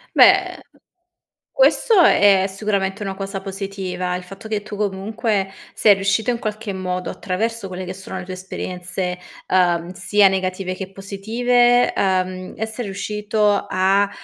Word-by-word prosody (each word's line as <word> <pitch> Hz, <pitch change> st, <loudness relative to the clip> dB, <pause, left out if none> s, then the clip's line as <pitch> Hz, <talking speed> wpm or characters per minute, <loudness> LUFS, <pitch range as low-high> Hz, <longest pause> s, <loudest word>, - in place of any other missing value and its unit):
Beh, -, -, +5 dB, 0.9 s
questo 475 Hz, -4 st, +4 dB
è 200 Hz, -, +5 dB
sicuramente 195 Hz, 0 st, -2 dB
una 195 Hz, -1 st, -4 dB
cosa 195 Hz, 0 st, -5 dB
positiva, 190 Hz, -2 st, -4 dB
il 180 Hz, -, -5 dB
fatto 195 Hz, +4 st, -11 dB
che 215 Hz, -2 st, -2 dB
tu, 210 Hz, 0 st, -7 dB
comunque, 200 Hz, 0 st, -1 dB, 0.2 s
sei 210 Hz, -, +6 dB
riuscito 205 Hz, +5 st, +1 dB
in 235 Hz, -, -3 dB
qualche 215 Hz, -2 st, -4 dB
modo, 185 Hz, -1 st, -3 dB
attraverso 225 Hz, +3 st, -3 dB
quelle 185 Hz, 0 st, -6 dB
che 185 Hz, -, -5 dB
sono 190 Hz, 0 st, -8 dB
le 185 Hz, -, -5 dB
tue 185 Hz, -, -6 dB
esperienze, 180 Hz, -1 st, -5 dB, 0.3 s
uhm, 175 Hz, -2 st, +2 dB
sia 195 Hz, +2 st, +4 dB
negative 185 Hz, -1 st, -1 dB
che 190 Hz, 0 st, -7 dB
positive, 240 Hz, +5 st, +2 dB
uhm, 185 Hz, -1 st, -1 dB
essere 220 Hz, +2 st, -4 dB
riuscito 210 Hz, +1 st, 0 dB
a, 195 Hz, +2 st, +2 dB
195 Hz, 140 wpm, -21 LUFS, 185-210 Hz, 0.9 s, sei